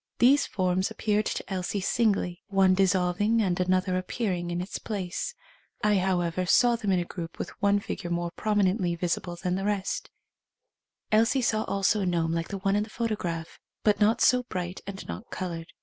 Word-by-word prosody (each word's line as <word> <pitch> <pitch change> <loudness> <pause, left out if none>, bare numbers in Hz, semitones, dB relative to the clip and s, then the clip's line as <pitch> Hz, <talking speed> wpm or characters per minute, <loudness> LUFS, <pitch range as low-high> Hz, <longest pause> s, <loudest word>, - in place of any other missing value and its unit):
These 270 +4 +5
forms 185 0 0
appeared 210 -1 0
to - - -2
Elsie 190 +1 -2
singly 195 -3 +1
— - - -61
one 195 -1 +4
dissolving 190 +3 +2
and 185 -5 +1
another 185 0 +1
appear 200 +2 -2
ing 175 -1 -3
in 175 0 -2
its 180 +3 -4
place. 205 - -4 0.5
I, 210 -2 +4
however, 180 -1 0
saw 240 +4 +5
them 215 -4 -1
in 185 - +3
a 175 - -2
group 165 -1 -7
with - - -4
one 200 0 +4
figure 195 -2 -5
more 170 0 -1
prominently 195 -3 +1
vis 170 0 0
ible 175 -1 -8
than 180 -1 -1
the 190 +1 -1
rest. 205 - -2 1.0
Elsie 230 +4 +3
saw 220 -2 +1
also 200 +2 +1
a 190 - 0
gnome 165 -2 +1
like 165 0 -1
the 200 - -4
one 195 +1 +1
in 205 - +2
the 215 - -4
photograph, 195 -8 -3 0.2
but 210 -1 +3
not 215 +2 +3
so 250 0 +5
bright 180 -6 -5
and 195 -1 -7
not 230 - -7
coloured. 170 -3 -5
190 Hz, 195 wpm, -27 LUFS, 180-210 Hz, 1.0 s, These